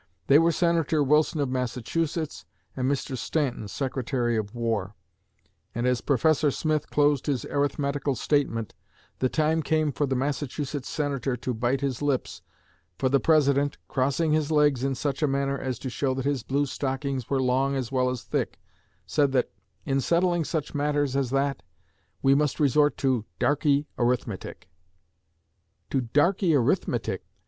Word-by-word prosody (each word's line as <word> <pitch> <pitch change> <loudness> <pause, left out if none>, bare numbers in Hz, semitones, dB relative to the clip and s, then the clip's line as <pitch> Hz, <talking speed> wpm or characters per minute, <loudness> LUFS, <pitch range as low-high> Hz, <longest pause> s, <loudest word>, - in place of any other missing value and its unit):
They 140 +2 +6
were 165 +1 +4
Senator 165 -2 +2
Wilson 150 +3 +2
of 140 - 0
Massachusetts 130 +6 -2 0.3
and 130 0 0
Mr. 135 -1 -2
Stanton, 130 -5 -2
Secretary 125 0 -1
of 110 +1 -3
War; 110 -4 -2 0.8
and, 120 +1 -1
as 125 -1 +1
Professor 150 +2 +2
Smith 155 +1 -1
closed 145 -1 +2
his 135 -5 -1
arithmetical 140 -1 -1
statement, 115 -4 0 0.5
the 130 - +1
time 160 +2 +1
came 155 -1 +1
for 145 +1 -1
the 135 - 0
Massachusetts 140 +1 -3
Senator 140 -4 -2
to 125 +1 -3
bite 120 +4 0
his 135 -2 -2
lips, 145 -3 -1 0.6
for 130 - +1
the 140 +1 +3
President, 145 -2 +3
crossing 140 +4 0
his 155 -1 +1
legs 150 -4 +3
in 135 -1 0
such 140 +2 -2
a 150 - +3
manner 140 0 0
as 130 -3 -3
to 130 - -6
show 130 +2 -1
that 130 0 -3
his 140 -3 0
blue 140 +5 0
stockings 135 -2 -3
were 135 - +1
long 130 +2 +1
as 130 -3 -3
well 130 -1 +2
as 125 -2 -4
thick, - - -2 0.5
said 145 -3 +2
that, 130 - +1 0.3
in 135 0 +1
settling 175 +3 +2
such 155 -1 -3
matters 145 -2 0
as 135 -3 0
that, 135 +1 0 0.6
we 135 - +5
must 145 0 +1
resort 150 0 +3
to 130 -5 +1 0.2
'darkey 145 0 +2
arithmetic.' 120 -4 -2 1.2
'To 135 - +1
darkey 165 - +2
arithmetic!' 125 -4 0
140 Hz, 155 wpm, -26 LUFS, 130-150 Hz, 1.2 s, They